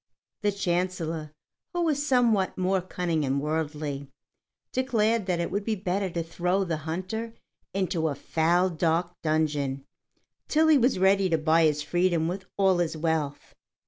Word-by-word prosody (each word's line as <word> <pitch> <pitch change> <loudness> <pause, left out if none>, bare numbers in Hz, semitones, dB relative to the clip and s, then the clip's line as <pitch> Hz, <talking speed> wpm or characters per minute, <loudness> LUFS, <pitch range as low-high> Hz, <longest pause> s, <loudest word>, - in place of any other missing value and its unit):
The 205 -1 +2
Chancellor, 175 -5 -2 0.4
who 350 0 0
was 295 -3 +1
somewhat 240 -8 +2
more 185 0 +1
cunning 175 -3 -2
and 135 0 0
worldly, 150 -2 -3 0.6
declared 230 -5 +1
that 180 -2 0
it 170 - -2
would 200 +2 -1
be 220 +1 -1
better 190 0 -1
to 170 -1 -3
throw 180 +4 0
the 170 -4 -2
hunter 220 +7 -4 0.4
into 180 -4 0
a 145 - -2
foul, 175 +5 +1
dark 170 +1 0
dungeon 145 -4 0 0.6
till 315 +1 +3
he 310 - +7
was 250 -1 +2
ready 190 0 +3
to 165 - +2
buy 160 +1 +3
his 150 -1 +1
freedom 175 0 +1
with 190 +2 -4
all 190 -2 +3
his 165 -2 -1
wealth. 155 -3 -2
175 Hz, 155 wpm, -27 LUFS, 160-195 Hz, 0.6 s, he